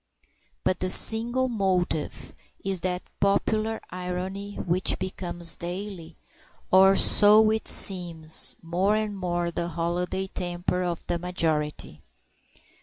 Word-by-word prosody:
But 185 - -1
the 185 - -2
single 240 +6 +4
motive 190 -8 -3 0.3
is 190 -3 -2
that 180 0 -3 0.2
popular 215 +2 0
irony 185 +3 -6
which 180 +1 -1
becomes 175 -2 -2
daily 175 -2 -7 0.6
or 190 +1 +5
so 215 +2 +6
it 220 0 -2
seems 170 -4 +3
more 180 +5 0
and 215 -1 -2
more 175 -2 -3
the 170 0 -3
holiday 175 +3 -3
temper 180 -1 -4
of 175 -2 -4
the 170 - -2
majority. 155 - -3
180 Hz, 110 wpm, -25 LUFS, 175-200 Hz, 0.6 s, so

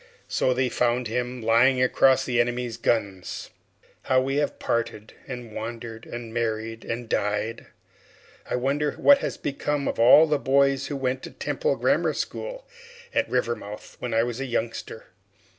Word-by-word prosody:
So 130 - +1
they 130 0 +2
found 125 0 +1
him 125 +1 -3
lying 120 +4 +4
across 130 +1 +4
the 120 -2 +2
enemy's 120 -1 -2
guns. 100 -5 -2 0.5
How 130 - +3
we 135 +2 -1
have 145 - 0
parted, 115 -2 -2
and 125 -4 -7
wandered, 115 0 -6
and 120 -1 -7
married, 115 -1 -2
and 120 +1 -4
died! 105 +2 -1 0.8
I - - 0
wonder 140 +3 0
what 285 -1 +6
has - - -3
become 145 0 -2
of - - -2
all 125 +7 +8
the 150 -2 +1
boys 135 +1 +2
who 145 - -4
went 130 -1 -1
to - - -7
the - - -20
Temple - - -1
Grammar - - +2
School - - -5 0.5
at - - +1
Rivermouth 115 -4 -3
when 125 - -4
I 115 - +4
was 120 0 -3
a 135 - -2
youngster? 115 -2 -4
120 Hz, 160 wpm, -25 LUFS, 115-135 Hz, 0.8 s, all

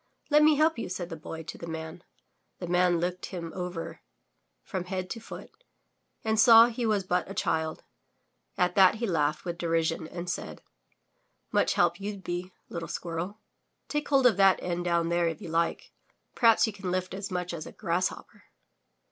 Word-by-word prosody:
'Xet 300 +1 +6
me 305 0 +6
help 310 -2 +2
you, - - -4
said 180 -1 -4
the 165 - -5
Boy 160 +1 -8
to - - -8
the 170 - -7
Man. 160 +2 -6 0.5
The 180 - -5
Man 180 0 +2
looked 180 +1 -3
him 170 -3 -6
over 180 -2 -5 0.6
from 180 -1 -4
head 185 0 -4
to 230 - -4
foot 225 - -10 0.7
and 220 -1 +1
saw 230 +1 +9
he 235 0 -2
was 210 -3 +1
but 180 0 -1
a 195 - -7
child. 160 -3 -1 0.7
At 180 0 +2
that 190 0 +6
he 230 +2 -2
laughed 155 -5 0
with 170 -1 -4
derision 165 -1 0
and 175 +2 -7
said: 175 - -5 0.9
''Much - - +3
help 175 0 +2
you*ll 205 +1 -4
be, 180 0 -5 0.2
little 170 -1 -6
squirrel. 175 +5 -5 0.5
Take 295 0 -2
hold 275 -2 +4
of 230 -6 +5
that 195 -1 +6
end 175 0 -2
down 170 -1 +1
there, 170 0 +2
if 165 -2 -3
you - - -8
like. 165 +1 -1 0.4
Perhaps 230 -3 +5
you 220 - -4
can 195 -2 -5
lift 185 0 -2
as 195 +1 -5
much 180 -2 -3
as 155 -2 -6
a - - -9
grass 180 -1 0
hopper! - - -12
180 Hz, 190 wpm, -28 LUFS, 170-200 Hz, 0.9 s, saw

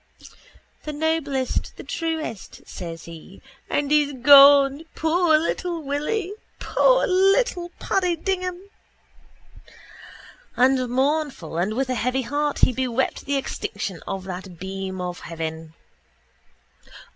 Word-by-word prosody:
—The 305 - -5
noblest, 295 -4 -2
the - - -8
truest, 320 - -5
says 165 -2 -7
he. 165 -2 -12 0.3
And 290 0 -1
he's 295 -1 +3
gone, 280 +2 +7
poor 320 0 +3
little 340 +2 -2
Willy, 320 +8 -2 0.2
poor - - +3
little 380 -1 +2
Paddy 365 -3 0
Dignam. 365 +1 -3 2.0
And 255 0 +3
mournful 270 - -1
and 190 +5 -1
with 265 +2 0
a - - +1
heavy 250 +2 -1
heart 290 +4 -1
he 255 - -1
bewept 255 0 -2
the 280 - -1
extinction 200 -8 -5
of 190 -1 -4
that 185 -1 -8
beam 190 +1 -5
of 180 -1 -4
heaven. 160 -1 -6
275 Hz, 110 wpm, -23 LUFS, 195-320 Hz, 2.0 s, gone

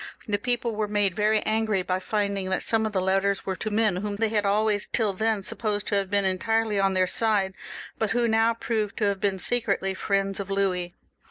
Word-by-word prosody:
The 205 -1 0
people 240 0 -1
were 210 0 -1
made 205 -2 0
very 215 0 +2
angry 215 -3 0
by 185 0 -1
finding 200 -1 -2
that 190 - -1
some 220 -1 +1
of - - -5
the 195 - 0
letters 195 +1 +1
were 190 - -2
to 215 - -3
men 210 -3 +1
whom 205 +2 -3
they 220 +1 0
had 210 -2 +1
always 210 0 +1
tiU 215 -4 0
then 220 +1 0
supposed 205 0 -2
to 205 - +1
have 195 -1 0
been 200 0 +2
entirely 215 +3 +1
on 195 -1 +2
their 185 0 +3
side, 200 -1 0 0.5
but 220 - 0
who 235 +2 +1
now 225 +1 +3
proved 220 -3 -2
to - - -1
have 200 -1 0
been 200 -2 +1
secretly 200 -2 0
friends 195 0 -1
of 195 -1 -5
Louis. 185 -3 -1
205 Hz, 220 wpm, -26 LUFS, 195-220 Hz, 0.5 s, their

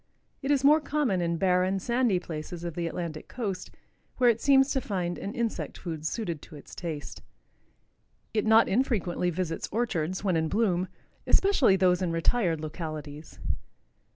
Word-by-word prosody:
It 270 - -3
is 280 -2 +3
more 300 +3 +6
common 280 -11 0
in 170 -1 0
barren, 185 +1 +2
sandy 235 0 +1
places 165 0 -6
of 170 -1 -4
the 170 +1 -2
Atlantic 165 -2 -5
coast, 200 -7 -4 0.5
where 245 -2 +6
it 230 - -5
seems 270 0 +5
to 265 - +1
find 180 -6 -2
an 205 +5 -5
insect 235 -3 -2
food 160 -3 -4
suited 170 -9 -3
to 160 - -12
its 145 - -12
taste. 160 -4 -6 1.1
It 220 0 +1
not 220 +1 +6
infrequently 195 -7 +1
visits 175 -1 -3
orchards, 185 -6 -1
when 190 -4 +1
in 160 -1 +1
bloom, 185 -4 +1 0.4
especially 345 - +4
those 180 -1 +3
in 180 -2 0
retired 165 -1 +1
localities. 155 -1 -6
185 Hz, 155 wpm, -28 LUFS, 165-235 Hz, 1.1 s, more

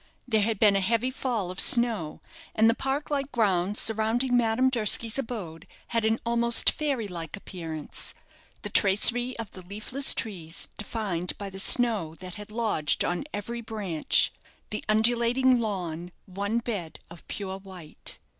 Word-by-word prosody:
There 220 -3 +2
had 220 +1 0
been 205 -1 +4
a - - +3
heavy 230 +6 +1
fall 235 -8 -2
of 185 - -8
snow, 230 -10 +4 0.3
and 220 +1 +5
the 230 - +5
park 270 +5 -3
like 280 -1 -1
grounds 200 -3 +1
surrounding 225 +3 +1
Madame 245 +2 +2
Durski's 230 0 +1
abode 195 - -6 0.2
had 230 -2 0
an 220 +1 +2
almost 235 0 +4
fairy 275 -8 -2
like 170 -2 -6
appearance, 165 -6 -6 0.5
the - - -4
tracery 240 +5 +4
of 225 -3 -6
the 185 - -10
leafless 215 +9 -1
trees 175 -6 -4
defined 195 -5 -3
by 200 -1 -6
the 190 - -7
snow 210 -8 +3
that 185 +1 -9
had 210 +1 -10
lodged 215 -10 +1
on 175 +9 -2
every 235 +4 -5
branch, 205 -8 0 0.4
the 215 - -3
undulating 240 +3 +3
lawn 180 -6 -4
one 200 +4 -2
bed 205 -9 -4
of 170 - -13
pure 195 -1 -5
white. 185 -5 -10
215 Hz, 155 wpm, -27 LUFS, 185-235 Hz, 0.5 s, and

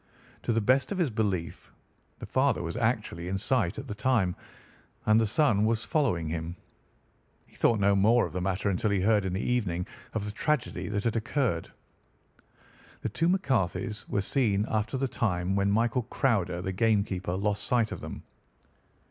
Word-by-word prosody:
To - - -1
the 115 - +2
best 130 - +2
of 200 - -2
his 170 -8 +1
belief, 100 -6 -2 0.5
the - - -7
father - - +1
was - - -4
actually 85 +1 -1
in 95 +1 -1
sight 100 -4 +1
at - - -6
the - - -4
time, 110 -5 +1 0.7
and 110 +1 +5
the 110 - +2
son 110 -3 +3
was 110 +1 +1
following 115 - 0
him. 80 +1 -4 0.9
He - - -25
thought 115 -2 +3
no 100 0 +4
more 110 +5 +4
of - - -8
the 90 - -2
matter 95 +2 -1
until 100 +3 0
he 100 -1 +1
heard 105 0 +3
in 95 - -2
the 95 - -1
evening 90 -8 0 0.3
of 105 -2 -1
the 105 - -3
tragedy 150 +4 -1
that 105 -1 -1
had 115 -1 0
occurred. 115 - -1 1.3
"The - - -2
two 165 +1 +1
McCarthys 120 - 0
were 100 - +1
seen 105 -2 +1
after 110 +4 0
the 135 +1 0
time 95 -6 -1
when 100 0 +2
William 120 +2 +1
Crowder, 90 -9 0
the 95 - -2
game 110 0 +3
keeper, 90 -2 -3
lost 100 +1 -1
sight 120 -3 +1
of - - -6
them. - - -7
105 Hz, 180 wpm, -28 LUFS, 95-120 Hz, 1.3 s, and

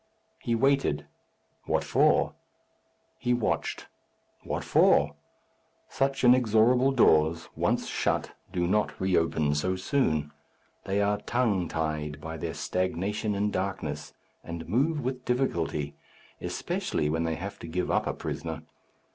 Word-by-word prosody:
He 115 - 0
waited. 125 - +2 0.6
What - - +1
for? - - +3 0.9
He 120 0 +1
watched. 120 - -1 0.6
What - - -3
for? 70 0 +4 0.8
Such 135 0 0
inexorable 125 +1 +5
doors, 80 - +3
once - - +1
shut, - - -1 0.2
do 90 -2 0
not 105 +4 0
re 95 -1 +1
open 80 -3 +2
so 95 +6 0
soon. 90 - 0 0.5
They 100 +1 +1
are 105 0 +1
tongue 105 -7 +1
tied 75 -2 -3
by 80 +2 -6
their - - -4
stagnation 95 +4 -1
in 105 +1 0
darkness, 80 -7 -3 0.3
and 85 -1 -6
move 145 - +1
with 130 0 -3
difficulty, 85 - -1 0.5
especially 75 - -2
when 80 +2 0
they 80 -1 -1
have 95 +5 -6
to - - -8
give 90 +3 -2
up - - +1
a - - 0
prisoner. - - -5
95 Hz, 130 wpm, -28 LUFS, 80-120 Hz, 0.9 s, inexorable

